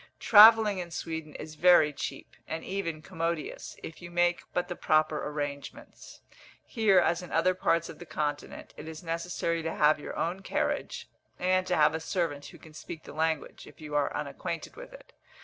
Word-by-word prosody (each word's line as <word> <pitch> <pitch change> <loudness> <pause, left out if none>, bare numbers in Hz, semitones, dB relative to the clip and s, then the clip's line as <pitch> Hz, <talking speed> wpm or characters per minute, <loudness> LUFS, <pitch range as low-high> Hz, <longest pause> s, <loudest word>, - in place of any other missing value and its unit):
Travelling 215 -2 +7
in 175 -1 -5
Sweden 160 -2 -6
is 155 0 -8
very 155 -2 +5
cheap, - - -7
and 160 0 -5
even 170 -5 -4
commodious, 165 -3 -4
if 160 +1 -9
you 175 - -8
make 175 0 +1
but 180 0 -1
the 175 - -5
proper 155 -1 +1
arrangements. 145 -1 -7 0.4
Here, 215 -5 +2
as 170 -1 +3
in 180 - -10
other 175 +3 +3
parts 170 -2 +1
of - - -11
the 175 - -9
Continent, 145 -1 -4
it - - -9
is 160 0 -8
necessary 170 0 -2
to 160 0 -4
have 150 0 +4
your - - -7
own 175 +3 -1
carriage, 195 - -2 0.3
and 185 0 +1
to 180 - +1
have 150 0 +4
a 160 - -2
servant 160 -4 -2
who - - -13
can 160 - -16
speak 160 +1 -9
the - - -11
language, 160 0 -2
if - - -16
you 150 -1 -9
are 145 -1 +1
unacquainted 150 +4 -5
with - - -11
it. - - -15
165 Hz, 185 wpm, -29 LUFS, 155-180 Hz, 0.4 s, Travelling